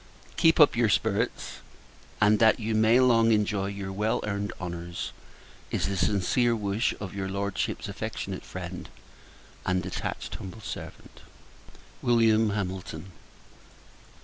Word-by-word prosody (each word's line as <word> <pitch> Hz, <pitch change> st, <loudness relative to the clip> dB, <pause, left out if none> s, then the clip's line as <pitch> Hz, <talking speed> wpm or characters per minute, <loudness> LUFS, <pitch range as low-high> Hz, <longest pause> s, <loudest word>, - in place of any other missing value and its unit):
Keep 165 Hz, -1 st, +4 dB
up 150 Hz, -, +7 dB
your 115 Hz, -2 st, +3 dB
spirits; 110 Hz, +2 st, 0 dB, 0.6 s
and, 105 Hz, +1 st, +4 dB
that 110 Hz, 0 st, +5 dB
you 110 Hz, 0 st, -2 dB
may 110 Hz, +3 st, +5 dB
long 115 Hz, -3 st, +5 dB
enjoy 105 Hz, -2 st, +1 dB
your 100 Hz, -1 st, -5 dB
well 105 Hz, +3 st, 0 dB
earned 100 Hz, -1 st, -2 dB
honours, 85 Hz, -1 st, -5 dB, 0.6 s
is -, -, -1 dB
the 100 Hz, -, -2 dB
sincere 100 Hz, +6 st, +2 dB
wish 105 Hz, +1 st, 0 dB
of 105 Hz, -3 st, -6 dB
your 95 Hz, -1 st, -3 dB
Lordship's 100 Hz, +1 st, -2 dB
affectionate -, -, -5 dB
friend, -, -, -7 dB, 0.7 s
and 90 Hz, 0 st, 0 dB
attached -, -, -4 dB
humble 95 Hz, +4 st, -9 dB
servant, -, -, -9 dB, 0.8 s
Wm. 115 Hz, -2 st, +4 dB
HAMILTON. 95 Hz, -3 st, -4 dB
105 Hz, 120 wpm, -27 LUFS, 95-115 Hz, 0.8 s, up